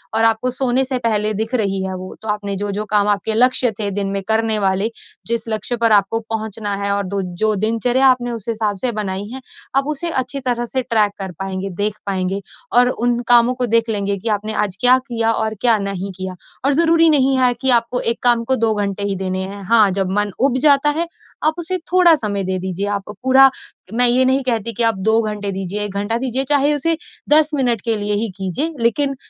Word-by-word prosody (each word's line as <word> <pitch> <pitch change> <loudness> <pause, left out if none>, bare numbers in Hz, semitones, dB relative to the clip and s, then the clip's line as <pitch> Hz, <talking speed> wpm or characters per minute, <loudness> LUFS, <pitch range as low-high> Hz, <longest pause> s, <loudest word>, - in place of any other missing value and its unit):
और 225 - +3
आपको 225 +2 +2
सोने 260 0 +2
से 260 0 -2
पहले 215 -1 0
दिख 220 +4 -3
रही 195 -4 -1
है 190 - -4
वो, 185 0 -8
तो 220 - -9
आपने 205 -1 -2
जो-जो 205 +1 -3
काम 205 -1 +3
आपके 205 +2 0
लक्ष्य 250 +1 +3
थे 205 -2 0
दिन 200 0 -3
में 195 - -4
करने 220 0 +1
वाले, 195 +2 0 0.4
जिस 230 0 -2
लक्ष्य 220 +2 -1
पर 230 -1 +2
आपको 205 +2 +3
पहुँचना 220 -2 -4
है 200 0 -1
और 200 0 0
दो 200 +1 -2 0.2
जो 215 0 +2
दिनचर्या 230 +5 +1
आपने 250 -2 +2
उस 230 -3 -7
हिसाब 215 -2 -1
से 245 +6 -1
बनाई 205 -2 -4
है, 265 - -7 0.3
आप 275 +1 +1
उसे 305 +3 -2
अच्छी 260 -2 -2
तरह 240 -1 0
से 260 +2 -2
ट्रैक 220 -5 +1
कर 190 -1 -5
पाएँगे, 195 0 -4
देख 205 +3 -2
पाएँगे, 190 0 -2 0.3
और 245 +1 +5
उन 240 -1 -1
कामों 240 0 +5
को 250 0 0
देख 230 0 +2
लेंगे 200 -2 -1
कि 225 +4 -3
आपने 215 +2 -5
आज 210 -3 -1
क्या 250 +1 +7
किया 230 -2 0
और 220 -1 -2
क्या 235 -3 +4
नहीं 200 -1 -4
किया, 185 -1 -6 0.3
और 280 - +3
ज़रूरी 330 +2 +5
नहीं 270 -3 +3
है 250 -1 +3
कि 265 - +4
आपको 240 0 +3
1 230 +1 0 0.2
को 265 - +2
2 225 -2 +1
घंटे 200 -1 -2
ही 200 -1 -1
देने 185 0 -3
हैं, 200 +1 -9
हाँ, 215 +1 +4
जब 190 0 -2
मन 205 0 0
उब 260 -1 +2
जाता 285 +1 +4
है 325 +3 -1 0.4
आप 310 +1 +2
उसे 360 +2 -1
थोड़ा 355 -2 +6
समय 205 -7 -2
दे 185 0 -2
दीजिए 190 +2 -4
आप 195 - -13
पूरा 265 +1 +6 0.4
मैं 245 +2 +4
ये 250 +2 +4
नहीं 260 +1 +2
कहती 230 -3 -1
कि 240 - +4
आप 225 -2 +4
2 220 +3 +2
घंटे 210 -2 -4
दीजिए, 195 +1 -4
1 205 -2 -5
घंटा 205 +3 -1
दीजिए, 260 +1 -1
चाहे 285 +1 +2
उसे 325 +3 0 0.3
10 305 0 +5
मिनट 245 -6 0
के 230 +1 0
लिए 205 0 -1
ही 215 +3 0
कीजिए। 200 - -3
लेकिन 275 +5 +1
225 Hz, 225 wpm, -18 LUFS, 200-255 Hz, 0.4 s, क्या